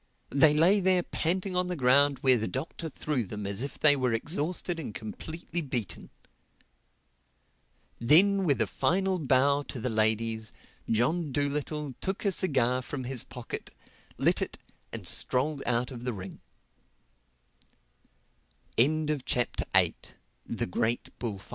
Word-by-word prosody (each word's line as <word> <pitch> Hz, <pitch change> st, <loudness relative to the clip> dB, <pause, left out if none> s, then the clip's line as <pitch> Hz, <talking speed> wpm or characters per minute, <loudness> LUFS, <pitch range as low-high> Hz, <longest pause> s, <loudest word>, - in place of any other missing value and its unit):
They 150 Hz, +1 st, +5 dB
lay 180 Hz, +7 st, +5 dB
there 185 Hz, -1 st, +3 dB
panting 185 Hz, +4 st, -2 dB
on 180 Hz, 0 st, +1 dB
the 180 Hz, -, -2 dB
ground 140 Hz, 0 st, +4 dB
where 130 Hz, -3 st, +5 dB
the 110 Hz, -, -2 dB
Doctor 160 Hz, +4 st, -5 dB
threw 145 Hz, -3 st, -2 dB
them 105 Hz, 0 st, -6 dB
as 100 Hz, +2 st, -2 dB
if 140 Hz, -, -4 dB
they 145 Hz, -1 st, +5 dB
were 130 Hz, -3 st, 0 dB
exhausted 165 Hz, +7 st, 0 dB
and 120 Hz, -10 st, -6 dB
completely 160 Hz, +10 st, -4 dB
beaten. 120 Hz, -, -3 dB, 1.9 s
Then 190 Hz, +11 st, +5 dB
with 145 Hz, -6 st, +2 dB
a -, -, -2 dB
final 190 Hz, +1 st, 0 dB
bow 140 Hz, 0 st, +3 dB
to 130 Hz, -, -5 dB
the 125 Hz, +2 st, -2 dB
ladies 110 Hz, 0 st, 0 dB, 0.4 s
John 145 Hz, +8 st, +1 dB
Dolittle 145 Hz, +1 st, -2 dB
took 190 Hz, +3 st, -3 dB
a 200 Hz, -, +3 dB
cigar 130 Hz, -9 st, +1 dB
from 130 Hz, +1 st, -5 dB
his 125 Hz, -1 st, 0 dB
pocket, 125 Hz, -2 st, -7 dB, 0.5 s
lit -, -, +3 dB
it -, -, -2 dB, 0.3 s
and -, -, -7 dB
strolled 140 Hz, +3 st, +1 dB
out 125 Hz, +1 st, +1 dB
of 120 Hz, -2 st, -8 dB
the 125 Hz, -3 st, -3 dB
140 Hz, 120 wpm, -28 LUFS, 125-165 Hz, 1.9 s, They